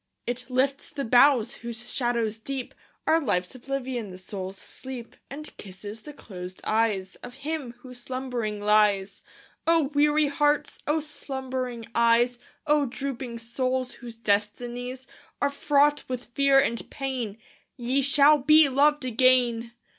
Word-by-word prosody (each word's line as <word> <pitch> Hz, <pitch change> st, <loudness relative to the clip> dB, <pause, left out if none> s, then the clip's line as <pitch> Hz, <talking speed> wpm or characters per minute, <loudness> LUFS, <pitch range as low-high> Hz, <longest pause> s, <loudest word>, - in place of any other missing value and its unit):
It 245 Hz, +1 st, -4 dB
lifts 270 Hz, +2 st, 0 dB
the 280 Hz, -, -4 dB
boughs, 245 Hz, 0 st, +5 dB
whose 235 Hz, +1 st, -7 dB
shadows 235 Hz, -3 st, 0 dB
deep 265 Hz, +2 st, -5 dB, 0.3 s
Are 325 Hz, +1 st, +4 dB
Life's 185 Hz, -, 0 dB
oblivion, 255 Hz, -3 st, -4 dB
the 185 Hz, -, -9 dB
soul's 190 Hz, 0 st, -6 dB
sleep, 255 Hz, 0 st, -9 dB
And 300 Hz, +3 st, -7 dB
kisses 205 Hz, +3 st, -8 dB
the 300 Hz, -, -9 dB
closed 185 Hz, -8 st, -9 dB
eyes 215 Hz, -4 st, 0 dB
Of 245 Hz, 0 st, -11 dB
him, 300 Hz, -6 st, -3 dB
who 255 Hz, 0 st, -11 dB
slumbering 245 Hz, -4 st, -4 dB
lies. 205 Hz, -2 st, +2 dB, 0.5 s
O 325 Hz, -4 st, +3 dB
weary 295 Hz, +1 st, +4 dB
hearts! 295 Hz, +1 st, +1 dB
O 305 Hz, +2 st, +2 dB
slumbering 260 Hz, -5 st, -4 dB
eyes! 235 Hz, +1 st, +3 dB, 0.3 s
O 295 Hz, -2 st, +3 dB
drooping 255 Hz, -2 st, -5 dB
souls, 255 Hz, +2 st, -1 dB
whose 240 Hz, -2 st, -10 dB
destinies 240 Hz, +4 st, -2 dB, 0.3 s
Are 285 Hz, -, +1 dB
fraught 290 Hz, +1 st, +3 dB
with 250 Hz, -1 st, -6 dB
fear 275 Hz, 0 st, +4 dB
and 235 Hz, -4 st, +2 dB
pain, 255 Hz, -6 st, -4 dB, 0.4 s
Ye 255 Hz, +3 st, +1 dB
shall 290 Hz, +2 st, +5 dB
be 305 Hz, +3 st, +6 dB
loved 290 Hz, +1 st, +3 dB
again! 245 Hz, -1 st, +3 dB
250 Hz, 135 wpm, -26 LUFS, 230-275 Hz, 0.5 s, be